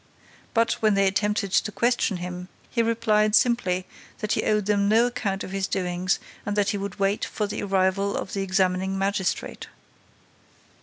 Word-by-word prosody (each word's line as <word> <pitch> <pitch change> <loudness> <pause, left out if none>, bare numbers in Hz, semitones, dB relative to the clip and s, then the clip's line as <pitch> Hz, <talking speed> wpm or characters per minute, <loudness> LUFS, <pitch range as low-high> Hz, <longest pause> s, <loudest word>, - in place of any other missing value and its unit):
But, 230 0 +3
when 215 -2 +3
they 195 0 +3
attempted 205 +1 0
to 210 - +2
question 235 -4 +1
him, 180 0 -6 0.2
he 235 - +1
replied 220 -2 +2
simply 215 -8 +2 0.3
that 215 - -3
he - - +2
owed 210 -2 +1
them 200 0 +2
no 225 +3 +5
account 205 -5 -2
of - - -7
his 195 0 -1
doings 180 0 0 0.3
and 205 - -3
that 205 -1 +2
he 205 - -2
would 200 -1 -5
wait 195 +1 0
for 210 - -2
the 205 - -4
arrival 195 0 +1
of - - -5
the 195 - -1
examining 190 0 0
magistrate. 195 -1 -2
200 Hz, 170 wpm, -25 LUFS, 190-215 Hz, 0.3 s, no